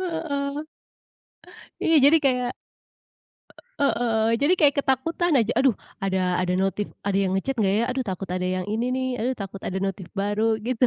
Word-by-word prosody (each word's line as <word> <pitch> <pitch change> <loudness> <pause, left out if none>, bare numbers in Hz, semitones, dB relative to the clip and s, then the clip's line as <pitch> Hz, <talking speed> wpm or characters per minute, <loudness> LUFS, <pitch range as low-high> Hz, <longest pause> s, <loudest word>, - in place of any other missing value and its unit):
heeh. 320 -6 -2 1.3
Iya 325 - +3
jadi 290 +3 +7
kayak 250 -2 +2 1.3
e - - +4
e - - +3
heeh, 225 -2 +2
jadi 295 +6 +4
kayak 290 -2 +5
ketakutan 325 +6 0
aja, 225 0 +1
"Aduh, 265 -5 +3 0.3
ada 190 -1 0 0.2
ada 180 0 0
notif, 195 +2 -1 0.2
ada 195 -1 +1
yang 190 -1 0
nge-chat 270 +8 -2
nggak, 195 -3 +2
ya? - - +2
Aduh, 260 0 -1
takut 190 0 -5
ada 180 0 -2
yang 185 -1 -3
ini, 230 +2 0
nih. 260 0 -1
Aduh, 250 +3 0
takut 195 0 -7
ada 185 - -3
notif 195 -2 -4
baru," 210 +3 +1
gitu 250 0 +2
230 Hz, 175 wpm, -24 LUFS, 195-275 Hz, 1.3 s, jadi